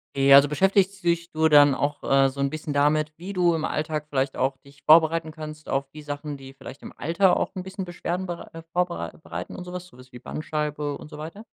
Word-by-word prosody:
Okay, 135 0 +5
also, 140 +1 +8
beschäftigst 195 +2 +2
dich 170 0 0
du 160 0 +2
dann 145 -2 +7
auch, 145 +2 -2
äh, 135 0 +4
so 135 +1 -4
'n 140 - +1
bisschen 155 -1 -5
damit, 150 +1 +2
wie 180 +5 -7
du 175 -3 +2
im 160 - -2
Alltag 150 -1 -2
vielleicht 135 -1 -1
auch 135 +1 0
dich 140 +2 -20
vorbereiten 160 0 +5
kannst 155 -1 -9
auf 135 0 -1
die 155 - -10
Sachen, 145 0 -5
die 135 -1 -12
vielleicht 135 0 -11
im - - -9
Alter 180 +4 +3
auch - - -2
'n 185 - -4
bisschen 190 0 -6
Beschwerden 175 +1 -4
berei 175 -2 -6
äh, 165 - -9
vorbereit 175 -2 -2
bereiten - - -6
und 180 - -7
so 180 - -9
was, 180 0 -6
so 125 - -19
was 125 0 -16
wie 125 - -10
Bandscheibe 150 -1 -3
und - - -11
so 150 - -10
weiter? 165 +8 -8
155 Hz, 240 wpm, -25 LUFS, 140-175 Hz, -, also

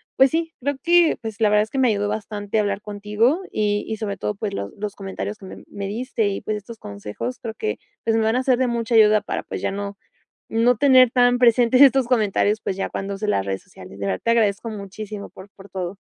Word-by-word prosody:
pues 265 0 +6
sí, 325 0 -1
creo 285 +3 -1
que, 345 -1 +4
pues, 220 -2 -6
la 215 - +5
verdad 210 0 +4
es 220 - -8
que 270 - -2
me 255 - +4
ayudó 205 -2 +1
bastante 210 0 -3
hablar 205 -1 -1
contigo 210 - 0
y 205 -1 0
y 220 - -3
sobre 200 -2 -4
todo, 210 +2 -3
pues, 200 -1 -4
los 100 - -4
los 205 0 -5
comentarios 200 +2 -5
que 195 - -11
me - - -10
me 200 -1 -6
diste 225 0 -1
y, 200 - -3
pues, 215 - -2
estos 225 +3 -10
consejos 105 - -6
creo 225 -2 -6
que, 435 - -3 0.2
pues, 225 -1 +1
me 225 - +2
van 220 +2 +2
a 255 - +1
ser 255 -1 +2
de 255 - +2
mucha 235 0 -2
ayuda 215 -1 +6
para, - - -3
pues - - -6
ya - - -1
no, 200 0 -5 0.5
no 235 +2 +3
tener 255 -3 +6
tan 245 0 +4
presentes 245 +1 +5
estos 270 -2 +6
comentarios, 215 -3 +1
pues, 190 - -3
ya 195 - -2
cuando 195 +1 -4
use 210 +2 -4
las 100 - +1
redes 95 -1 -3
sociales. 100 - -13
De 100 - -3
verdad, 95 - -2
te - - +2
agradezco 225 -1 +1
muchísimo 205 0 -7
por 190 +2 -14
por 195 0 -15
todo. 185 0 -5
215 Hz, 240 wpm, -22 LUFS, 200-240 Hz, 0.5 s, pues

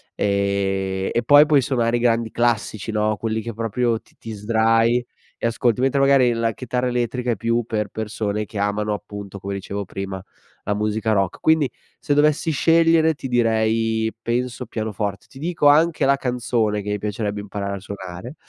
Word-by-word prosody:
e 95 -1 0
e 120 - +2
poi, 145 +4 +7
puoi 145 -3 +4
suonare 120 -2 +1
i - - -2
grandi 115 -1 +1
classici, 115 -2 -1
no, 110 0 +1
quelli 110 +1 -2
che 115 +2 -6
proprio 115 +1 -1
ti - - -28
ti 115 - -8
sdrai 115 +3 +2 0.3
e - - -1
ascolti, 120 0 +1
mentre 135 +1 +2
magari 135 -3 +5
la 115 -1 0
chitarra 125 +1 -3
elettrica 125 0 -1
è 115 - 0
più 115 +3 0
per 105 -2 -2
persone 105 -1 -3
che 105 - -9
amano, 105 +1 0
appunto 100 -1 -7
come 100 +1 -4
dicevo 100 +1 -5
prima, 95 0 -6 0.4
la 105 - 0
musica 110 +1 -1
rock. 95 -3 0
Quindi, 160 -4 +3 0.3
se 145 - 0
dovessi 150 +2 +2
scegliere, 165 +1 +4
ti 135 - -6
direi 115 -2 +1
penso, 125 +2 -2
pianoforte. 105 -3 -4
Ti 135 - -13
dico 165 -1 +1
anche 155 +1 +4
la 140 +1 +4
canzone 120 -5 -1
che 100 - -6
mi 105 - 0
piacerebbe 105 0 -3
imparare 100 -1 -4
a - - -6
suonare, 100 - -8
115 Hz, 175 wpm, -22 LUFS, 105-125 Hz, 0.4 s, poi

